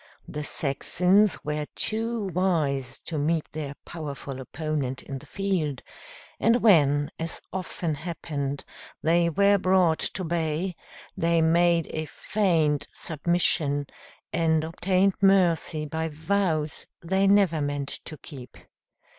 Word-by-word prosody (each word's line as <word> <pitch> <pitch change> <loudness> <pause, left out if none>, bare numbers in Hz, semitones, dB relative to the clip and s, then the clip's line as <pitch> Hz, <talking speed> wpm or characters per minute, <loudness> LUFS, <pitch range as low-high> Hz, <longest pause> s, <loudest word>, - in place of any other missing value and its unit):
The 150 - -5
Saxons 180 +8 +2
were 150 0 -2
too 225 0 -1
wise 155 -8 0
to 160 -3 -4
meet 160 +2 +1
their 145 -2 -5
powerful 140 -4 -6
opponent 145 -2 -3
in 135 -1 -6
the - - -16
field, 180 -9 -2 0.6
and 230 +2 +4
when, 145 -7 +4
as 165 0 -4
often 180 -3 -3
happened, 145 -3 -4 0.4
they 170 +1 +3
were 200 +3 +4
brought 185 -3 +3
to 190 - 0
bay, 165 +1 -1 0.4
they 170 0 +2
made 170 0 +3
a 155 0 -3
feigned 160 -6 0
submission, 155 -3 0 0.5
and 160 -2 +2
obtained 185 +4 +1
mercy 175 -5 +3
by 160 +2 -2
vows 160 -1 -1 0.2
they 190 +3 +2
never 195 -6 +4
meant 145 -1 -2 0.2
to 155 - -6
keep. 130 -6 -11
160 Hz, 120 wpm, -26 LUFS, 150-185 Hz, 0.6 s, and